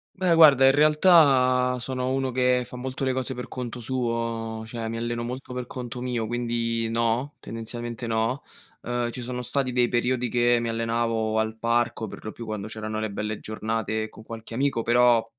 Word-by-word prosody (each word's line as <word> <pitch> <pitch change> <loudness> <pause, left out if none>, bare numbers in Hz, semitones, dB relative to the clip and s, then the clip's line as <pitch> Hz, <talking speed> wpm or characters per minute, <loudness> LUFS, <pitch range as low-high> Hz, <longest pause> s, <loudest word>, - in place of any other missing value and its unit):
Beh, 180 -3 +2
guarda, 145 -5 +8
in 135 - +7
realtà, 140 -5 +5
sono 130 0 -2
uno 135 -1 0
che 125 0 +2
fa - - -9
molto 130 +2 -4
le 130 - +1
cose 130 0 -2
per 125 -1 -6
conto 125 -1 -5
suo, 115 -2 -2
cioè 115 0 -5
mi 115 - -4
alleno 120 0 -2
molto 125 +2 -6
per 125 -1 -4
conto 125 0 -6
mio, 120 -3 -2
quindi 115 -1 -1
no, 115 +5 0
tendenzialmente 120 +1 -5
no. 115 +4 0 0.4
Uhm, 120 0 -1
ci 125 - -5
sono 125 +1 -4
stati 130 +2 0
dei 125 -1 +3
periodi 125 0 0
che 120 0 +3
mi 115 - -2
allenavo 115 -1 0
al 110 0 -1
parco 115 -1 0
per - - -10
lo 110 - -5
più 115 - -8
quando 110 -2 -4
c'erano 110 0 -4
le 110 -1 -2
belle 105 +1 -3
giornate 110 0 -3
con 110 - -13
qualche 115 0 -9
amico, 135 -2 0
però, 120 -1 +4
120 Hz, 185 wpm, -25 LUFS, 115-125 Hz, 0.4 s, guarda